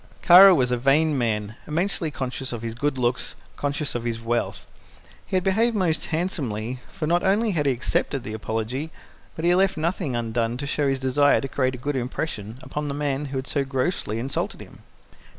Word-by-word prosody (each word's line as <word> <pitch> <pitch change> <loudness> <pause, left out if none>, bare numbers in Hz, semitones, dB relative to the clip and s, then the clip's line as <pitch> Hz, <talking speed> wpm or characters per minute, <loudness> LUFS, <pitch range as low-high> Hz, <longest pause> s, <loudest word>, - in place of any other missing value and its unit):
Kara 185 +2 +9
was 125 -4 +1
a 125 - +2
vain 145 +4 +3
man, 110 -4 -1
immensely 170 +1 0
conscious 130 -2 -4
of 120 -2 -5
his 115 -1 -3
good 135 +3 -1
looks, 125 0 -1 0.2
conscious 145 +1 -2
of 120 - -3
his 115 -1 -2
wealth. 115 +1 -2 0.6
He - - -3
had 185 - +2
behaved 220 +5 +2
most 175 -6 +1
handsomely, 130 - -2
for 155 - -4
not 175 +3 +2
only 205 +3 +2
had 150 -6 0
he - - +4
accepted 130 +1 -1
the 110 - -6
apology, 115 +7 -3 0.5
but 160 - -3
he 175 - +5
left 190 0 +2
nothing 160 -4 -1
undone 115 0 -1
to 140 - -4
show 145 0 0
his 135 0 +1
desire 130 +2 +3
to 135 - -3
create 130 -1 0
a - - -7
good 145 +4 -3
impression 120 -3 -4
upon 150 +3 -4
the 140 - -3
man 145 -1 -1
who 135 -1 -4
had 130 - -3
so 140 0 -1
grossly 135 - -2
insulted 130 +4 -3
him. - - -13
135 Hz, 200 wpm, -24 LUFS, 120-160 Hz, 0.6 s, Kara